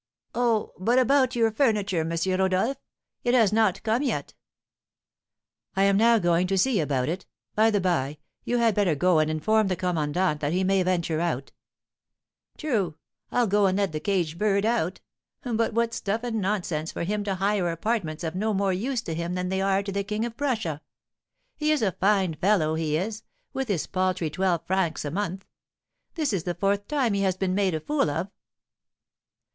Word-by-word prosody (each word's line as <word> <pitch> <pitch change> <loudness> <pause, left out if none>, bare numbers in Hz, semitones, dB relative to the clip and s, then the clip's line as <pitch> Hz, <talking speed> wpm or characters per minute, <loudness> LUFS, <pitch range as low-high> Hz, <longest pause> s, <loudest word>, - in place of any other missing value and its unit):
Oh! 235 -3 +1
but 235 +7 +2
about 260 0 +3
your 225 -2 +3
furniture, 210 - +1
M. 160 0 -1 0.3
Rodolph; 190 +8 +1 0.5
it 245 +1 +2
has 220 -5 +4
not 215 -4 +2
come 225 +3 +1
yet." 285 - -2 1.4
"I 195 - +3
am 200 0 +4
now 230 +3 +5
going 175 -2 +2
to 195 +1 0
see 240 +1 +2
about 140 -5 0
it. 180 +4 -4 0.3
By 220 +1 +4
the 210 -2 +2
by, 155 -6 0 0.3
you 245 - 0
had 230 -2 +3
better 195 -6 +2
go 180 +2 +3
and 155 0 +2
inform 215 +8 +2
the 185 - 0
commandant 175 -2 0
that 145 +2 0
he 185 +1 +1
may 195 0 +2
venture 170 -3 0
out." 155 -6 -2 1.1
"True; 210 - -1 0.4
I'll 245 - +2
go 205 -1 +3
and 190 0 +1
let 200 -3 +1
the 155 - -3
caged 170 -2 -1
bird 200 -1 +2
out. 220 -6 0 0.4
But 230 -3 0
what 230 +1 +1
stuff 215 +3 -2
and 225 -3 -2
nonsense 175 -5 -2
for - - -4
him 205 +4 -1
to 195 -2 -1
hire 195 -1 +1
apartments 170 -2 -2
of 160 -1 -2
no 210 +3 -1
more 195 -1 +1
use 235 +5 -2
to 165 - -4
him 170 +2 -3
than 180 0 -2
they 190 0 0
are 195 0 +2
to 200 - -4
the 200 +1 -1
King 210 +3 -2
of 235 -1 -6
Prussia! 220 - -2 0.7
He 305 0 0
is 300 -6 +1
a 195 - +2
fine 190 -2 +1
fellow, 160 -1 +2
he 155 -1 0
is, 210 +5 -3 0.3
with 270 -1 -2
his 195 -8 -1
paltry 185 -3 -1
twelve 175 -1 0
francs 180 -4 0
a 145 - -3
month. 190 +1 -3 0.7
This 305 - 0
is 190 - 0
the 175 -1 -3
fourth 200 +3 0
time 270 -7 +1
he 200 - 0
has 190 -2 +1
been 185 -1 0
made 190 -3 +1
a - - -1
fool 285 - 0
of." 165 +7 -3
195 Hz, 195 wpm, -26 LUFS, 175-220 Hz, 1.4 s, now